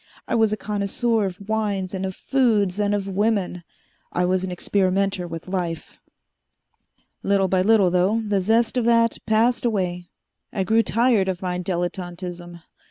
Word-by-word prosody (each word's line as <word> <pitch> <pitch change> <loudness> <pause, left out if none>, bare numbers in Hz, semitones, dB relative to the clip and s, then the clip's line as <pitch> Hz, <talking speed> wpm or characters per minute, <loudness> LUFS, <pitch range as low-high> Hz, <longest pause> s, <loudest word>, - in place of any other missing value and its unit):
I - - -2
was 220 -2 +3
a 215 - -1
connoisseur 210 +2 -1
of 190 +2 -9
wines 205 -4 -1
and 190 0 -2
of 190 - -6
foods 215 -8 +1
and 205 0 +1
of 200 -1 -3
women. 195 -3 0 0.5
I 180 - 0
was 185 +1 +1
an 190 - -3
experimenter 190 0 0
with 165 0 -8
life. 175 -3 -4 1.2
"Little 195 -1 +2
by 185 0 +2
little, 200 -2 +4
though, 185 +5 +2
the 205 -3 0
zest 225 +5 +2
of 240 - +1
that 230 -1 +3
passed 225 +3 +2
away. 180 -6 -1 0.4
I 195 - -1
grew 220 +4 +3
tired 230 -4 +2
of 185 0 -4
my 180 -1 -2
dilettantism. 175 -1 -5
195 Hz, 160 wpm, -23 LUFS, 180-220 Hz, 1.2 s, little